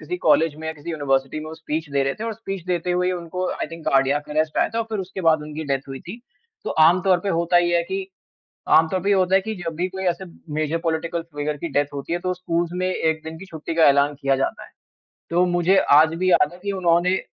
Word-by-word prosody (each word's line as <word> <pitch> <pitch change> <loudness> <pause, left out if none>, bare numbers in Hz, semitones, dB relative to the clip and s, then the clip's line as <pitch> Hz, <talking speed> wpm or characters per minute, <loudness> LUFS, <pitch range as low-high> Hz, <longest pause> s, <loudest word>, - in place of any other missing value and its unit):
किसी 360 - -4
कॉलेज 160 -2 +4
में 160 +1 -7
या - - -2
किसी 150 +3 -8
यूनिवर्सिटी 140 -2 -1
में 155 - -7
वो 160 - -7
स्पीच 160 -1 -4
दे 140 -1 +1
रहे 135 0 -1
थे 220 - -6
और 230 - -2
स्पीच 195 -5 -6
देते 180 0 -1
हुए 180 +1 +1
उनको 180 +1 -4
आई - - -4
थिंक 165 -1 -9
कार्डियक 135 +2 +2
अर्रेस्ट 155 +1 0
आया - - +3
था 230 - +1
फिर 215 - -2
उसके 190 0 -6
बाद 155 -1 +3
उनकी 150 +1 -6
डेथ 135 0 -3
हुई 135 -1 -7
थी। 225 +7 -7 0.4
तो - - -3 0.2
आमतौर 185 +1 +3
पर 200 - -2
होता 170 +1 +3
ये 175 0 +2
है 170 - +2
कि 190 0 -2 0.7
आमतौर 160 +4 +1
पर 195 - -2
ये 205 - +5
होता 190 -1 +2
है 195 - +6
कि 220 +2 -4
जब 165 -1 -4
भी 180 +3 -1
कोई 190 +1 -6
ऐसे 190 - -9 0.3
मेजर 155 +1 0
पॉलिटिकल 165 +1 -2
फिगर 150 +1 -2
की 170 - -4
डेथ 145 0 0
होती 140 +4 -5
है 175 - +1
तो 180 - 0
स्कूल्स 170 -2 -2
में 185 - +1
एक 160 -3 -1
दिन 160 0 -7
की 190 - -10
छुट्टी 160 0 -5
का 165 - +5
ऐलान 140 +1 +3
किया 135 -1 +2
जाता 135 - -2
है। - - -16 0.6
तो 175 +2 +3
मुझे 175 +2 +2 0.2
आज 160 +1 +4
भी 185 +2 +1
याद 150 -2 +4
है 175 - -13
कि 200 - -1
उन्होंने 175 +2 +3
165 Hz, 255 wpm, -22 LUFS, 155-185 Hz, 0.7 s, है